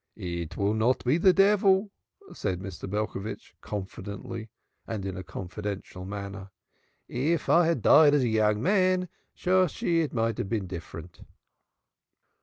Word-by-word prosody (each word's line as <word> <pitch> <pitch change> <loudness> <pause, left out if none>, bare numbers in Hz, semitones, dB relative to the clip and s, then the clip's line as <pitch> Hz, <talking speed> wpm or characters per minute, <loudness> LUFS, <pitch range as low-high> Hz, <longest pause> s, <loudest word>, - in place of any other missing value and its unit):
"It 85 -2 -5
will 100 +1 +1
not 115 +4 +1
be 140 +7 +3
the 185 +2 +6
devil," 195 0 +4 0.4
said 95 -3 -2
Mr. 95 0 -7
Belcovitch, 105 0 -4
confidently 105 +3 -6 0.4
and 105 -4 -4
in 95 -2 -4
a 95 - -5
confidential 90 +1 -6
manner. 100 0 -6 0.6
"If 150 +6 -1
I 170 -1 +5
had 165 -10 0
died 150 -1 +7
as 140 - +3
a - - +2
young 110 -1 +2
man, 185 0 +2 0.3
Shosshi, 180 -2 +2
it 155 - -2
might 115 -2 -1
have 95 - -3
been 110 -4 -1
different." 85 -1 -9
110 Hz, 140 wpm, -27 LUFS, -, 0.6 s, died